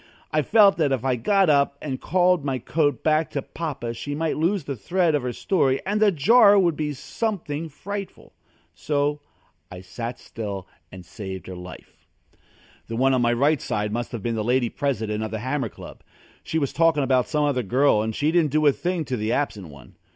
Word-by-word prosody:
I 155 Hz, -, +2 dB
felt 205 Hz, +5 st, +5 dB
that 150 Hz, -4 st, +1 dB
if 130 Hz, -2 st, -1 dB
I 130 Hz, -2 st, +2 dB
got 195 Hz, -, +2 dB
up 140 Hz, -2 st, +2 dB
and 135 Hz, -4 st, -5 dB
called 180 Hz, -3 st, +2 dB
my 135 Hz, -2 st, -1 dB
coat 145 Hz, +4 st, -1 dB
back 155 Hz, 0 st, +2 dB
to 140 Hz, -, -4 dB
Papa 140 Hz, -8 st, -5 dB
she 145 Hz, +5 st, -5 dB
might 160 Hz, +1 st, -1 dB
lose 175 Hz, +3 st, 0 dB
the 140 Hz, -1 st, -4 dB
thread 175 Hz, -, 0 dB
of 145 Hz, -, +1 dB
her 125 Hz, 0 st, -3 dB
story, 135 Hz, -2 st, +1 dB
and 205 Hz, +2 st, -1 dB
the 210 Hz, -2 st, +5 dB
jar 205 Hz, -, +6 dB
would 175 Hz, -5 st, +3 dB
be 150 Hz, -1 st, -2 dB
something 160 Hz, -, -4 dB
frightful. 200 Hz, +6 st, -7 dB, 0.4 s
So 145 Hz, 0 st, -1 dB, 0.5 s
I 90 Hz, 0 st, -9 dB
sat 115 Hz, +6 st, -6 dB
still 100 Hz, -4 st, -6 dB, 0.2 s
and 95 Hz, -1 st, -11 dB
saved 95 Hz, -2 st, -7 dB
her 95 Hz, -, -8 dB
life. 90 Hz, 0 st, -12 dB, 0.8 s
The 115 Hz, -, -5 dB
one 135 Hz, +3 st, +3 dB
on 130 Hz, -, +2 dB
my 120 Hz, 0 st, +2 dB
right 140 Hz, +4 st, +2 dB, 0.3 s
must 120 Hz, +2 st, -3 dB
have 115 Hz, -5 st, -6 dB
been 120 Hz, -, -1 dB
the 110 Hz, -1 st, -2 dB
Lady 120 Hz, +1 st, +1 dB
President 110 Hz, -7 st, -2 dB
of 110 Hz, -, -3 dB
The 110 Hz, -, -4 dB
Hammer 130 Hz, +1 st, -2 dB
Club. -, -, -12 dB, 0.4 s
She 160 Hz, -, -2 dB
was 140 Hz, -4 st, -1 dB
talking 165 Hz, -2 st, +3 dB
about 130 Hz, -1 st, +2 dB
some 150 Hz, -1 st, 0 dB
other 140 Hz, -3 st, +1 dB
girl 125 Hz, +1 st, +2 dB
and 110 Hz, 0 st, -3 dB
she 150 Hz, +2 st, +1 dB
didn't 165 Hz, -3 st, +3 dB
do 155 Hz, +2 st, +1 dB
a 145 Hz, -, +7 dB
thing 175 Hz, +2 st, -2 dB
to 130 Hz, -, -2 dB
the 110 Hz, +1 st, -2 dB
absent 110 Hz, -9 st, -2 dB
one. 70 Hz, -4 st, -15 dB
140 Hz, 205 wpm, -24 LUFS, 120-160 Hz, 0.8 s, a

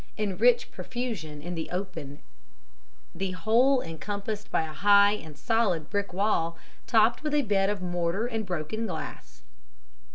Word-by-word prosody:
in 205 Hz, -3 st, -1 dB
rich -, -, +3 dB
profusion 195 Hz, -, -5 dB
in 175 Hz, +2 st, -4 dB
the 165 Hz, -2 st, -4 dB
open, 175 Hz, -7 st, -5 dB, 1.0 s
the 190 Hz, +2 st, -2 dB
whole 240 Hz, +9 st, +3 dB
encompassed 205 Hz, +6 st, -5 dB
by -, -, +1 dB
a 155 Hz, -1 st, -6 dB
high 200 Hz, +3 st, +6 dB
and 160 Hz, -8 st, -6 dB
solid 210 Hz, -8 st, 0 dB
brick 200 Hz, -1 st, -1 dB
wall, 175 Hz, -4 st, 0 dB, 0.3 s
topped 225 Hz, 0 st, +4 dB
with 300 Hz, -1 st, -1 dB
a 295 Hz, -, +3 dB
bed 195 Hz, -3 st, +2 dB
of 205 Hz, -3 st, -2 dB
mortar 175 Hz, +4 st, -1 dB
and 225 Hz, -4 st, -3 dB
broken 180 Hz, +6 st, -3 dB
glass. 185 Hz, -, -7 dB
200 Hz, 150 wpm, -28 LUFS, 170-220 Hz, 1.0 s, high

